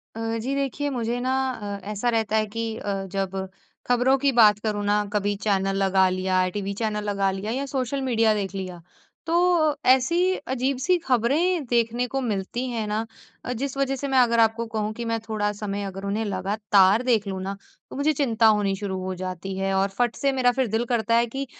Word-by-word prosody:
अ, 225 0 -2
जी 260 +5 -2
देखिए 280 +1 -1
मुझे 240 -2 -2
ना 255 +1 -1 0.2
अ, 205 -4 -6
ऐसा 215 +4 -1
रहता 220 -1 0
है 215 - +2
कि 230 +2 -4
अ, 205 - -3 0.2
जब 190 0 -2 0.4
खबरों 245 +2 +3
की 275 +1 +2
बात 215 -4 +6
करूँ 210 -1 -2
ना 210 +1 +2
कभी 205 0 0
चैनल 195 -2 +1
लगा 190 0 +4
लिया, 185 0 +1
टीवी 200 +1 -4
चैनल 210 -1 -1
लगा 195 -1 +1
लिया 195 +3 -4
या 270 +4 -2
सोशल 270 +1 -1
मीडिया 230 -4 +2
देख 200 -2 -3
लिया, 185 -3 -6 0.4
तो 335 -2 +3 0.2
ऐसी 265 +8 +3 0.3
अजीब 265 +1 0
सी 365 0 +4
खबरें 290 +8 +2
देखने 240 0 0
को 270 - +1
मिलती 225 +1 -2
हैं 225 -3 -3
ना 215 +2 -1 0.4
अ, - - -3
जिस 275 0 -3
वजह 270 -1 0
से 280 +2 -4
मैं 270 -1 +1
अगर 235 -2 +3
आपको 225 +1 +2
कहूँ 215 -1 -1
कि 235 +2 -6
मैं 230 0 -1
थोड़ा 210 -1 0
समय 205 -1 -4
अगर 195 0 -6
उन्हें 205 +3 -1
लगातार 200 +1 +3
देख 225 -5 +1
लूँ 190 -1 -4
ना 195 +1 -4 0.3
तो - - -9
मुझे 290 +3 +2
चिंता 230 -5 +2
होनी 205 -2 +3
शुरू 190 -1 -4
हो 185 0 -3
जाती 185 +1 -5
है 195 0 -1
और 195 +1 +2
फट 240 -1 +1
से 275 -1 +1
मेरा 255 -2 +3
फिर 260 0 0
दिल 225 +2 0
करता 230 -1 +2
है 235 0 +4
कि 270 +4 -4
220 Hz, 210 wpm, -24 LUFS, 200-255 Hz, 0.4 s, बात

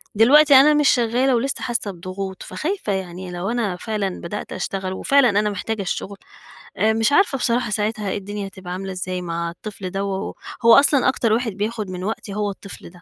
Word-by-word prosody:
دلوقتي 285 +7 +6
أنا 295 +3 +7
مش 295 -1 +4
شغّالة 245 +2 +2
ولسّه 270 +4 -1
حاسّة 230 -4 -1
بضغوط، 185 +2 -6
فخايفة 325 - -3
يعني 185 -1 -5
لو 175 +4 -3
أنا 230 -6 -1
فعلًا 200 -1 -3
بدأت 205 +5 -6
أشتغل 190 -1 -3
وفعلًا 275 +4 +3
أنا 210 +1 +1
محتاجة 205 +2 -3
الشُغل 195 +1 -4 0.6
آآ 220 +3 +3
مش 225 +3 +1
عارفة 290 -4 +3
بصراحة 240 -2 0
ساعتها 210 -1 -1
إيه - - -2
الدنيا 200 0 -5
هتبقى 185 -2 -8
عاملة 190 +1 -5
إزاي 185 0 -4
مع 170 -1 -3
الطفل 195 +2 -7
دوّة، 195 0 -3 0.3
هو 230 - +8
أصلًا 280 -1 +5
أكتر 230 -4 +1
واحد 230 -1 0
بياخُد 210 +1 -3
من 180 0 -6
وقتي 205 0 -4
هو 205 0 -1
الطفل 200 0 -11
ده، 175 0 -18
205 Hz, 190 wpm, -21 LUFS, 190-235 Hz, 0.6 s, هو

